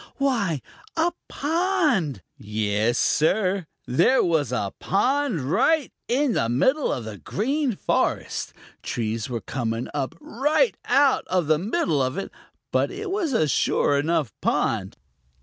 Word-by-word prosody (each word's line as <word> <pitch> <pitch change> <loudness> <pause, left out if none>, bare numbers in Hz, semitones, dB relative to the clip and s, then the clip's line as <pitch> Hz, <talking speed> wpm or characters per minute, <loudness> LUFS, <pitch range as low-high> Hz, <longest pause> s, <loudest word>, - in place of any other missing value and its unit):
Why, 205 - 0 0.3
a 330 +2 +3 0.2
pond! 300 - 0
Yes, 105 +2 0
Sir, 185 +2 +2 0.2
there 170 - +3
was 155 -7 +1
a 100 -6 -2
pond 255 - +1
right 275 - +2
in 260 +1 +2
the 115 - +1
middle 260 - +2
of 120 - -3
the 105 -3 -7
Green 255 - -1
Forest! - - -1 0.3
Trees 115 0 -3
were 120 -2 -3
coming 115 -2 -3
up 145 +2 -2
right 300 - +1
out 275 -1 +3
of 180 -3 +1
the 155 0 +2
middle 185 - 0
of 130 +1 -1
it, 195 - -4 0.4
but - - +2
it 390 +1 -5
was 380 -6 0
a 155 -9 +3
sure 140 0 +2
enough 150 -5 0
pond. - - 0
180 Hz, 135 wpm, -24 LUFS, -, 0.4 s, a